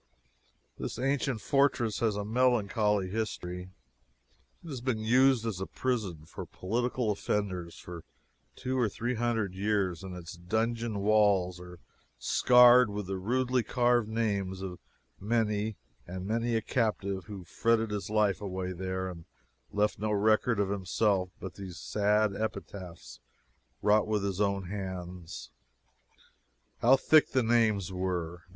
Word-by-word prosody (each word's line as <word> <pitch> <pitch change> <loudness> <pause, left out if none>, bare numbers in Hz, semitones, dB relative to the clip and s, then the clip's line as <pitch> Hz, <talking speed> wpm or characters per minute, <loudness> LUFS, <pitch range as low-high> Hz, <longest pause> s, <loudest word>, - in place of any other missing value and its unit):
This - - -4
ancient 135 -2 0
fortress 130 -4 +2
has 110 -3 +1
a 105 0 -3
melancholy 105 -4 +2
history. 90 -3 -4 0.9
It 170 - -9
has 130 -5 -5
been 120 -4 -1
used 125 +1 +4
as 110 -5 -2
a 95 - -3
prison 105 -12 -2
for - - -8
political 120 +3 -1
offenders 95 -4 -2
for 85 -2 -9 0.5
two 130 0 -2
or 115 -4 +2
three 120 +5 -2
hundred 115 -5 -1
years, 100 -3 0
and 95 -1 -7
its 85 -1 -8
dungeon 110 +4 -1
walls 100 -4 +3
are 90 0 -11 0.4
scarred 125 - +6
with 105 0 -4
the 95 0 -3
rudely 125 +5 +1
carved 120 0 +2
names 100 -4 -1
of 90 -2 -6 0.4
many 105 0 0 0.3
and 90 +1 -6
many 115 +3 0
a 110 - 0
captive 100 -6 -1
who 100 -4 -8
fretted 115 +5 +1
his 100 -2 -3
life 105 -2 +2
away 95 -2 -3
here 95 +1 -3
and 85 -3 -8 0.5
left 105 0 0
no 105 0 -1
record 110 +2 +2
of 100 -1 +1
himself 95 0 +1
but 95 - -7
these 95 -4 -8
sad 105 +3 +1
epitaphs 90 - -6 0.6
wrought 105 +1 +4
with 105 -2 0
his 100 0 -1
own 100 -1 +1
hands. 90 -3 -6 1.3
How 120 +4 +6
thick 155 +3 +4
the 130 -1 +3
names 110 -5 +2
were! 90 -2 -3
105 Hz, 140 wpm, -30 LUFS, 95-115 Hz, 1.3 s, scarred